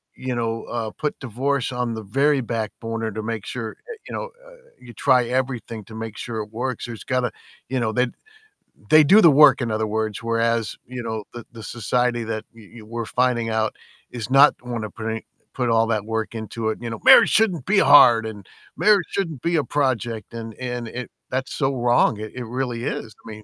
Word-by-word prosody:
you 130 Hz, -1 st, -4 dB
know, 115 Hz, -1 st, -2 dB
uh, 115 Hz, -2 st, -4 dB
put 150 Hz, +5 st, -4 dB
divorce 135 Hz, +2 st, -1 dB
on 125 Hz, -2 st, -2 dB
the 110 Hz, -, -6 dB
very 135 Hz, +7 st, +2 dB
back 115 Hz, -3 st, -3 dB
burner 115 Hz, -1 st, -3 dB
to 110 Hz, -, -4 dB
make 110 Hz, -2 st, -4 dB
sure, 115 Hz, -3 st, -4 dB, 0.2 s
uh, 460 Hz, -, -7 dB
you -, -, -8 dB
know, -, -, -4 dB, 0.2 s
uh, -, -, -15 dB, 0.3 s
you 120 Hz, -1 st, -13 dB
try 125 Hz, +2 st, +3 dB
everything 125 Hz, -3 st, -3 dB
to 110 Hz, -, -12 dB
make 110 Hz, -1 st, -6 dB
sure 115 Hz, -2 st, -5 dB
it 105 Hz, -, -15 dB
works. 125 Hz, +3 st, -3 dB
There's 115 Hz, -2 st, -8 dB
gotta 125 Hz, -1 st, 0 dB, 0.4 s
you 130 Hz, -, -1 dB
know, 115 Hz, -2 st, 0 dB
they 125 Hz, +1 st, +2 dB, 0.8 s
they 155 Hz, 0 st, +8 dB
do 200 Hz, +9 st, +7 dB
the 170 Hz, -, +8 dB
work, 140 Hz, -1 st, +7 dB
in 120 Hz, -, -1 dB
other 110 Hz, 0 st, 0 dB
words, 110 Hz, 0 st, -2 dB
whereas, 115 Hz, -2 st, 0 dB
you 125 Hz, 0 st, -6 dB
know, 110 Hz, -2 st, -4 dB
the 120 Hz, -1 st, -8 dB
the 115 Hz, -, -11 dB
society 120 Hz, +1 st, -1 dB
that 110 Hz, -1 st, -3 dB
we 115 Hz, +1 st, -14 dB
we're 115 Hz, +2 st, -5 dB
finding 125 Hz, -1 st, 0 dB
out 110 Hz, -1 st, 0 dB, 0.4 s
is 120 Hz, -2 st, -6 dB
not 140 Hz, +2 st, +7 dB
wanna 120 Hz, -3 st, -4 dB
put 110 Hz, +3 st, -7 dB
any 110 Hz, 0 st, -5 dB, 0.3 s
put 125 Hz, -2 st, -1 dB
all 115 Hz, 0 st, +4 dB
that 110 Hz, -3 st, -1 dB
work 110 Hz, 0 st, -3 dB
into 110 Hz, 0 st, -3 dB
it. 110 Hz, -, -3 dB
You 120 Hz, -, -4 dB
know, 115 Hz, -1 st, -6 dB
"Marriage -, -, +8 dB
shouldn't 185 Hz, -, +2 dB
be 210 Hz, -, +3 dB
hard," 120 Hz, -8 st, +7 dB
and, 105 Hz, -3 st, -8 dB, 0.3 s
"Marriage 205 Hz, -4 st, +4 dB
shouldn't 165 Hz, -9 st, -3 dB
be 170 Hz, +1 st, +1 dB
a 150 Hz, -, +2 dB
project," 120 Hz, -8 st, -2 dB
and 115 Hz, -1 st, -7 dB
and 125 Hz, -2 st, -4 dB
it 125 Hz, +2 st, -7 dB, 0.2 s
that's 130 Hz, +1 st, -3 dB
so 135 Hz, -1 st, 0 dB
wrong, 120 Hz, -3 st, +2 dB
it 110 Hz, 0 st, -6 dB
it 125 Hz, -1 st, -5 dB
really 120 Hz, 0 st, -3 dB
is. 110 Hz, -, -4 dB
I 110 Hz, -, -8 dB
mean, 110 Hz, 0 st, -10 dB
120 Hz, 215 wpm, -22 LUFS, 110-130 Hz, 0.8 s, they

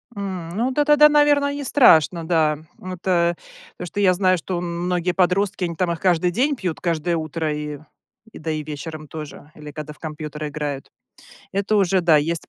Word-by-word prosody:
М, 190 Hz, -4 st, -5 dB
ну 240 Hz, +4 st, 0 dB
да 295 Hz, +3 st, +1 dB
тогда, 300 Hz, 0 st, +7 dB
наверное, 290 Hz, -1 st, +3 dB
нестрашно, 190 Hz, -, +4 dB
да. 155 Hz, -3 st, +2 dB, 0.2 s
Вот, 185 Hz, -1 st, -8 dB
э, 175 Hz, -2 st, +2 dB, 0.4 s
потому -, -, -6 dB
что 205 Hz, -, -5 dB
я 185 Hz, -2 st, +4 dB
знаю, 185 Hz, 0 st, +2 dB
что 180 Hz, +2 st, -4 dB
м 175 Hz, 0 st, -4 dB
многие 180 Hz, 0 st, 0 dB
подростки, 185 Hz, +1 st, +1 dB
они 170 Hz, -1 st, -4 dB
там 175 Hz, +1 st, 0 dB
их 170 Hz, -, -4 dB
каждый 180 Hz, -1 st, +2 dB
день 275 Hz, -, +1 dB
пьют, 180 Hz, -8 st, -4 dB
каждое 170 Hz, 0 st, -1 dB
утро 155 Hz, 0 st, -3 dB
и 150 Hz, -1 st, -5 dB, 0.5 s
и -, -, -10 dB
да, 160 Hz, 0 st, -3 dB
и 155 Hz, -1 st, -2 dB
вечером 155 Hz, +1 st, -7 dB
тоже 150 Hz, -1 st, -9 dB
или 150 Hz, -1 st, -10 dB
когда 150 Hz, 0 st, -7 dB
в -, -, -25 dB
компьютер 155 Hz, -1 st, -6 dB
играют. 145 Hz, -2 st, -5 dB, 0.6 s
Это 200 Hz, +2 st, 0 dB
уже 195 Hz, -1 st, +3 dB
да, 170 Hz, -3 st, +4 dB
есть 160 Hz, +2 st, -1 dB
170 Hz, 190 wpm, -22 LUFS, 155-195 Hz, 0.6 s, тогда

